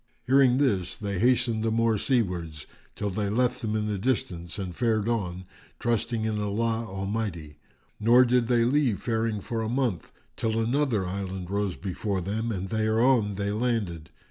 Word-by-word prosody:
Hearing 130 -1 +5
this 100 -11 +1
they 100 -3 -3
hastened 120 -2 +2
the 115 - +1
more 115 -1 +2
seawards 90 - -1 0.3
till 100 -1 -2
they 100 +1 -1
left 125 +4 +1
them 110 -1 -2
in 105 -1 0
the 105 -2 -2
distance 90 -7 -2
and 95 -4 -5
fared 110 -3 +1
on, 95 -6 -2 0.3
trusting 115 -1 -1
in 105 -1 -1
Allah 115 +3 -1
Almighty; 95 -5 -4 0.4
nor 120 +4 +6
did 125 -1 +2
they 120 -1 +3
leave 130 -4 +2
faring 110 -2 -1
for 115 +3 -3
a 110 - -2
month, 120 - -1 0.2
till 110 - -1
another 120 -3 +1
island 95 -1 -4
rose 100 -2 -1
before 95 +2 -3
them 110 +6 -2
and 95 -2 -4
thereon 110 0 +2
they 100 +1 -1
landed. 105 -8 -2
110 Hz, 165 wpm, -27 LUFS, 95-115 Hz, 0.4 s, nor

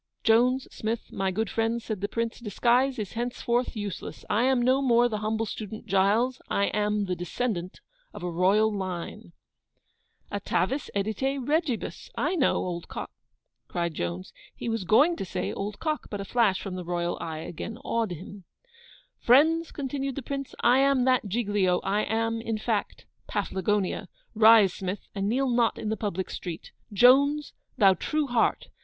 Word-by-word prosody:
'Jones, 250 +3 +3
Smith, 220 +1 -4
my 195 0 -1
good 215 +4 -1
friends,' 225 +2 -1
said 215 -4 -4
the 205 - 0
PRINCE, 230 +2 -3
'disguise 245 +4 +2
is 210 -4 -5
henceforth 240 +1 -1
useless; 205 -4 -6
I 225 +4 +3
am 260 -1 +3
no 255 +3 +3
more 240 -2 +4
the 215 -3 -3
humble 220 +1 -1
student 215 0 -7
Giles, 210 +7 +2
I 200 - +1
am 210 0 +1
the 185 -1 -2
descendant 180 +1 -3 0.3
of - - -9
a 180 - -2
royal 205 +5 +3
line.' 185 +1 -5 1.0
'Atavis 275 +2 -1
edite 220 +7 -1
regibus, 300 -5 -1
I - - +1
know, 315 -7 +2
old 175 -2 -3
co - - -5 0.3
' - - -55
cried 170 -2 -2
Jones. 85 - -4 0.2
He - - -6
was 225 -4 -2
going 295 - +4
to - - -3
say 190 - -3
old 200 +1 -4
cock, 310 -2 -2
but 205 - -4
a 200 - -4
flash 210 -3 +2
from 195 - -6
THE 185 -1 -5
ROYAL 175 0 -2
EYE 160 -1 -4
again 220 +7 -6
awed 230 -2 0
him. 185 +3 -10 0.7
'Friends,' 320 +7 +4
continued 275 -1 -3
the 280 - -5
Prince, 275 +1 -5
'I 245 +2 +5
am 275 -2 +3
that 255 -4 +2
Giglio, 200 -4 +1
I 205 +2 0
am, 225 +1 -1
in 225 -1 -2
fact, 215 -1 -2 0.2
Paflagonia. 200 -1 -1 0.3
Rise, 220 -3 +7
Smith, 190 +1 -5
and 200 0 -1
kneel 260 +2 +1
not 235 -1 +2
in 215 - -3
the 220 - 0
public 195 -3 -3
street. 170 -3 -6 0.2
Jones, 280 +7 +4 0.2
thou 195 -2 +6
true 305 +9 -1
heart! 245 -4 +1
220 Hz, 170 wpm, -27 LUFS, 195-250 Hz, 1.0 s, Rise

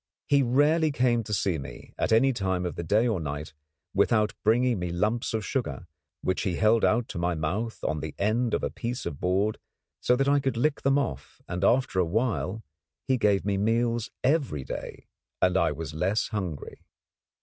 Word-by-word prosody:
He 140 -1 +4
rarely 150 +5 +3
came 125 -4 +2
to 105 - -7
see 95 -5 0
me, 65 -3 -10
at - - -1
any 135 +4 +4
time 95 -5 -1
of 90 - -2
the - - -5
day 105 +8 +2
or 110 -6 0
night, 75 0 -5 0.4
without 105 +2 +2
bringing 120 0 +3
me 90 0 -2
lumps 105 +7 0
of 110 -3 -2
sugar, 85 - -3 0.4
which 95 - 0
he 95 -5 -1
held 110 +4 +3
out 115 +1 +2
to - - -5
my 90 0 0
mouth 95 +9 -3
on 75 0 -1
the 80 0 -6
end 115 +4 +1
of - - -3
a - - -1
piece 120 +2 -4
of 75 -5 -5
board 95 +4 0 0.4
so 125 - +3
that 135 +2 +1
I 145 0 +4
could 135 -4 -1
lick 145 +5 +1
them 135 +1 +3
off; 70 - -3
and 90 +1 -3
after 120 -3 +2
a 90 - +3
while 110 +2 -1 0.4
he 130 - +3
gave 100 -3 +2
me 100 -1 0
meals 115 +2 +1
every 130 - +1
day, - - -7 0.3
and 90 0 +2
I 85 -4 +3
was 75 0 -6
less 95 +7 0
hungry. 95 -9 -5
105 Hz, 195 wpm, -27 LUFS, 90-120 Hz, 0.4 s, He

